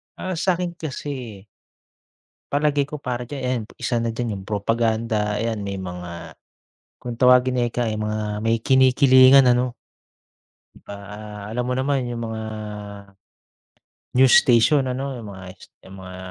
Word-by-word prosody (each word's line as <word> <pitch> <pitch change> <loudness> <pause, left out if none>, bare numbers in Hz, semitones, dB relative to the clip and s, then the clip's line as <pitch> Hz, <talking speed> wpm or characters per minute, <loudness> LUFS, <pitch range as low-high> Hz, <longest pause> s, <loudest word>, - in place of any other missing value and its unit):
Ah, 185 -1 -4
sa'kin 180 0 0
kasi 130 - -7 1.0
palagay 145 -1 +1
ko 150 - -7
para 125 -4 -4
diyan 140 0 -6
ayan, 125 -2 -1
isa 120 -1 -1
na 115 - -1
diyan 115 -3 -3
yung 95 - -12
propaganda, 110 0 0
ayan. 115 0 -2
May 100 -1 -4
mga 90 -2 -7 0.7
kung 120 - -6
tawagin 125 +1 +4
ika 120 +1 -2
ay 110 -1 -2
mga 105 -1 -3
may 115 +1 +1
kinikilingan, 130 +1 +6
ano? 125 0 +2 1.1
Pa - - -8
ah, 105 +1 -9
alam 125 +3 -2
mo 125 - -1
naman 135 +1 0
yung 120 -1 -5
mga 110 0 -5 1.8
news 130 -1 +6
station, 130 +3 +3
ano? 135 +2 -3
Yung 110 -4 -8
mga 95 -1 -10
yung - - -30
s - - -12 0.2
'yong 95 - -12
mga 90 0 -9
120 Hz, 145 wpm, -22 LUFS, 105-130 Hz, 1.8 s, kinikilingan